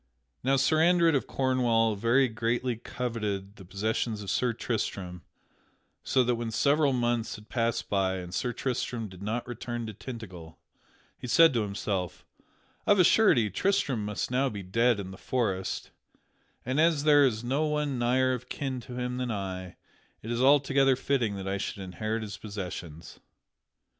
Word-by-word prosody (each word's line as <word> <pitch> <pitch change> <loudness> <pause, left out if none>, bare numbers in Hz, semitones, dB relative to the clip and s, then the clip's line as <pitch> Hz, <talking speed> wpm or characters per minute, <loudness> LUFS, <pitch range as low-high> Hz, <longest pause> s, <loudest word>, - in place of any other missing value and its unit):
Now 135 +2 +3
Sir 145 +4 +3
Andred 170 -1 +4
of 135 - 0
Cornwall 120 -4 +2
very 120 +6 +3
greatly 115 +2 -1
coveted 105 -4 -4
the 95 - -11
possessions 105 +3 -2
of 100 - -3
Sir 125 -1 +1
Tristram, 100 -6 -3 0.8
so 130 - +2
that 125 0 +1
when 115 -1 -3
several 140 +5 +3
months 120 -3 0
had 105 +1 -14
passed 115 -2 -1
by 95 -2 +1
and 90 -1 -7
Sir 125 - -1
Tristram 120 -3 -3
did 95 0 -13
not 110 +4 -3
return 120 0 -5
to 110 - -6
Tintagel, 95 -9 -9 0.6
he - - -6
said 165 +4 +6
to 115 - +1
himself: 100 -3 -3 0.6
"Of 205 - +5
a 185 - +6
surety, 125 - +4
Tristram 140 - 0
must 105 +3 -3
now 135 +2 +2
be 100 -4 -6
dead 115 +4 +2
in 95 -1 -6
the 95 - -11
forest, 100 -7 -2 0.7
and, 130 +5 +1
as 160 -3 +3
there 145 -1 +6
is 115 -4 +1
no 140 +6 0
one 150 -3 -1
nigher 130 +2 +2
of 125 0 -6
kin 135 -3 -3
to 125 +1 -9
him 125 0 -3
than 125 -1 -2
I, 95 -4 -4 0.5
it 115 - -5
is 120 +1 -1
altogether 135 -1 +4
fitting 125 -5 0
that 95 -1 -6
I 100 +1 -1
should 105 - -4
inherit 110 +4 -3
his 105 -2 -6
possessions." 90 -6 -7
115 Hz, 170 wpm, -28 LUFS, 100-130 Hz, 0.8 s, said